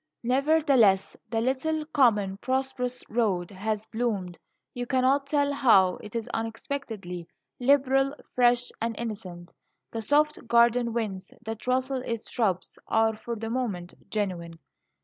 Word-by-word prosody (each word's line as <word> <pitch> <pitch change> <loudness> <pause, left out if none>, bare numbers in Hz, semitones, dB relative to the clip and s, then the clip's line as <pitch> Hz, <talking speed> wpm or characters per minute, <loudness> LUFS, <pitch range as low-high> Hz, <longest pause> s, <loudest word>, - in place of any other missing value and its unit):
Nevertheless, 260 -6 +3
the 225 0 0
little, 300 +5 0
common, 215 -10 +2
prosperous 255 0 -2
road, 205 -6 0
has 210 +2 -3
bloomed, 210 -7 -2 0.3
you 245 0 -4
cannot 265 +2 +2
tell 285 -1 +1
how. 195 -10 +5
It 210 +1 -11
is 230 -2 -2
unexpectedly 225 - -5 0.3
liberal, 270 +1 +3 0.2
fresh, 245 0 +3
and 230 0 -1
innocent. 195 -7 -6 0.4
The 225 - -3
soft 295 +2 +1
garden 235 0 +4
winds 205 -5 -3
that 225 +1 -6
rustle 260 +1 +1
its 230 -3 -4
shrubs 195 -7 -1
are, 220 0 +2
for 235 +2 -5
the 225 +1 -5
moment, 205 -9 -3 0.2
genuine. 175 -6 -3
235 Hz, 130 wpm, -27 LUFS, 205-260 Hz, 0.4 s, how